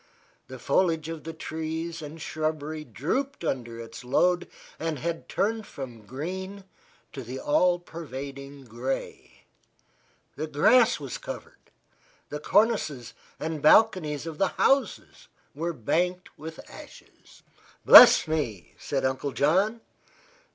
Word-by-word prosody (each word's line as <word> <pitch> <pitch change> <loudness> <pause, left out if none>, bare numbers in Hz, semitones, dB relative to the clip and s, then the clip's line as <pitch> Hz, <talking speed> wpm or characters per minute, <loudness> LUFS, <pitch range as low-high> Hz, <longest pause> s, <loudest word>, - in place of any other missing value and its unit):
The - - -9
foliage 165 -4 +1
of 165 -2 -7
the 165 - -5
trees 160 +1 -5
and 155 +2 -9
shrubbery 155 0 -3
drooped 170 - -3
under 120 -6 -3
its 115 +3 -9
load 175 +8 +2 0.3
and 160 -2 -2
had 165 +4 -4
turned 220 +1 -1
from 120 -6 -9
green 190 - -6 0.5
to 135 - -6
the 125 +2 -7
all 175 +5 +2
pervading 140 -4 -9
gray. 120 - -6 0.9
The 155 +2 -4
grass 220 - +4
was 140 -4 -6
covered; - - -10 0.6
the 150 - -5
cornices 190 - +1 0.3
and 160 -1 -4
balconies 155 -5 +4
of 160 -2 -7
the 195 - +3
houses 275 - 0 0.3
were 165 +3 -3
banked 180 - -2
with 160 +1 -9
ashes. - - -15 0.4
"Bless - - +10
me!" 120 - -3
said 135 -2 -2
Uncle 130 +1 -2
John. 195 +10 +2
155 Hz, 120 wpm, -26 LUFS, 135-175 Hz, 0.9 s, Bless